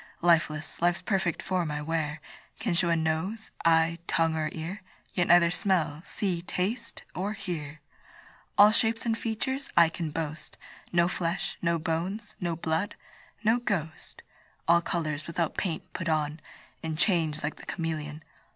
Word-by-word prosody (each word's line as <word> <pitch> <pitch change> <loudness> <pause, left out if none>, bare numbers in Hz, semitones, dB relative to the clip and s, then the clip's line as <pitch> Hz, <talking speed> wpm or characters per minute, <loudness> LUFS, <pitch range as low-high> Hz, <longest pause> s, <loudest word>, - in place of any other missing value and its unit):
Lifeless, 160 -3 +2
life's 175 +1 +2
perfect 190 -4 0
form 180 -4 0
I 150 0 -3
wear, 155 -1 -1 0.4
Can 220 -6 0
show 170 0 +2
a 170 - +4
nose, 165 +7 -1
eye, 165 0 +4
tongue, 165 -1 +2
or 155 -1 0
ear, 170 +5 -5 0.3
Yet 175 - +2
neither 170 -1 +6
smell, 175 -4 +1
see, 185 -5 -1
taste, 195 +7 -2
or 195 +6 -2
hear. 155 -7 -5 0.8
All 205 +1 +9
shapes 225 +1 +2
and 225 -1 +2
features 245 +5 -2
I 170 -1 +8
can 165 -1 -3
boast, 155 0 -4 0.3
No 170 0 +4
flesh, 175 0 -1
no 170 -1 +2
bones, 175 +7 -2
no 175 -2 -1
blood 160 +4 -1 0.5
no 225 +3 +4
ghost: 165 -9 -3 0.4
All 170 +1 +6
colours, 155 -3 -2
without 170 -1 -1
paint, 165 -4 -3
put 170 -2 -2
on, 155 0 0 0.4
And 160 -1 -3
change 160 -5 +2
like 145 - -2
the - - -11
cameleon. 155 -2 -3
170 Hz, 150 wpm, -29 LUFS, 160-190 Hz, 0.8 s, All